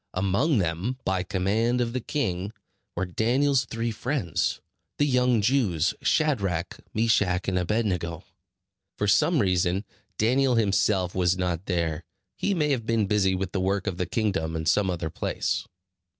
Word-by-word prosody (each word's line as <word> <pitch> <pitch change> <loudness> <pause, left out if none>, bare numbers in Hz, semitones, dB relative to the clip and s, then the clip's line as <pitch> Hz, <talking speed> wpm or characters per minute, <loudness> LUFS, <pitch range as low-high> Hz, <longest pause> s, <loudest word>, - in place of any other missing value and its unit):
Among 100 - +2
them, 90 +7 -1
by 95 -1 +1
command 105 +7 0
of 120 -1 -1
the 130 - -2
king, 100 -9 -2 0.4
were 95 - -1
Daniel's 125 +7 +1
three 115 0 -3
friends, 115 - -1 0.4
the 145 - +3
young 125 -5 +2
Jews, 100 - +2
Shadrach, 100 - 0
Meshach, 105 -5 +1
and 95 -1 +1
Abed 105 +6 0
nego. 85 -2 -2 0.7
For 105 - 0
some 165 - +3
reason, 95 -2 +1 0.3
Daniel 125 +3 +3
himself 100 -4 +2
was 90 0 +1
not 90 -1 -2
there. 85 -3 -1 0.3
He 200 - 0
may 150 -3 +1
have 115 -5 -1
been 115 -2 +2
busy 95 -2 +2
with 95 -1 -3
the 95 - -1
work 95 +1 0
of 95 -4 -2
the 90 - -2
kingdom 95 -6 -1
in 80 0 -3
some 100 +3 +2
other 85 -3 -3
place. - - -2
100 Hz, 155 wpm, -26 LUFS, 90-120 Hz, 0.7 s, the